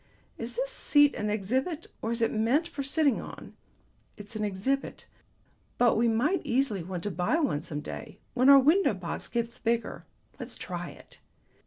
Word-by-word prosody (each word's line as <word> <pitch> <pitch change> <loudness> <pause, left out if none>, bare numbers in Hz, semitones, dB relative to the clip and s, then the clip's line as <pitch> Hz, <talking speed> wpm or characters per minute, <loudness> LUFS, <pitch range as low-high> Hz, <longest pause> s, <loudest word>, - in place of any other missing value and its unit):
Is - - -5
this - - -1
seat 290 - +4
an 210 - -2
exhibit 260 - -1 0.2
or 225 - -2
is 235 0 0
it 225 - +2
meant 240 +9 +2
for 340 -4 -5
sitting 280 -1 +2
on?" - - -10 0.6
"It's 205 +2 -10
an 215 - -2
exhibit, 210 +8 -2 0.7
but 245 -2 +4
we 235 +2 +3
might 250 +12 +2
easily 255 - 0
want 175 0 -5
to 205 - -2
buy 180 - 0
one 255 - 0
some 150 -2 -5
day, 180 - -8 0.2
when 255 +2 +4
our 280 - +10
window 305 - +4
box 180 -2 -5
gets 235 -1 -3
bigger. 230 0 -2 0.3
Let's - - -7
try - - -5
it." - - -15
235 Hz, 175 wpm, -28 LUFS, 210-280 Hz, 0.7 s, our